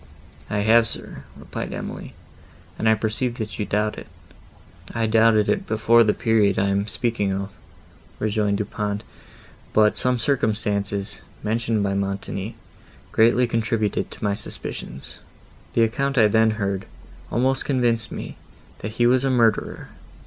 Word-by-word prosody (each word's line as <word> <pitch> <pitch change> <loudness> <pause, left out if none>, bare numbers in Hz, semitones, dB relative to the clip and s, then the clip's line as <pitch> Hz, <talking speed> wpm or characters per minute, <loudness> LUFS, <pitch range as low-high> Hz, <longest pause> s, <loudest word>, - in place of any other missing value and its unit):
"I 105 -1 0
have, 110 +2 +5
sir," - - -3
replied - - -6
Emily, - - -7 0.6
"and 110 - +3
I 110 - +5
perceive, 115 +3 -1
that 110 -2 -5
you 105 - 0
doubt 105 +1 0
it." - - -11 0.9
"I 115 0 +1
doubted 110 -1 +4
it - - 0
before 115 +2 +4
the 105 - +3
period 110 -4 +2
I 100 +1 +2
am 100 +1 0
speaking 110 -2 -1
of," 100 +1 -3 0.7
rejoined 105 -1 0
Du 105 - -1
Pont;—"but 105 +1 -2
some 125 0 +2
circumstances, 105 -6 -1 0.2
mentioned 110 -1 0
by 100 -1 0
Montoni, 100 +1 -3 0.6
greatly 120 +3 +4
contributed 110 -2 -1
to - - -11
my 100 -1 +1
suspicions. 105 +1 -7 0.5
The 115 - +4
account 135 +4 0
I 110 - +7
then 110 +1 +4
heard, 100 -2 -2 0.4
almost 130 +2 +1
convinced 120 -4 +1
me, - - -7 0.4
that 110 - -5
he 120 +1 +2
was 125 +2 +4
a 135 - +2
murderer. 115 -4 +1
110 Hz, 140 wpm, -23 LUFS, 105-115 Hz, 0.9 s, I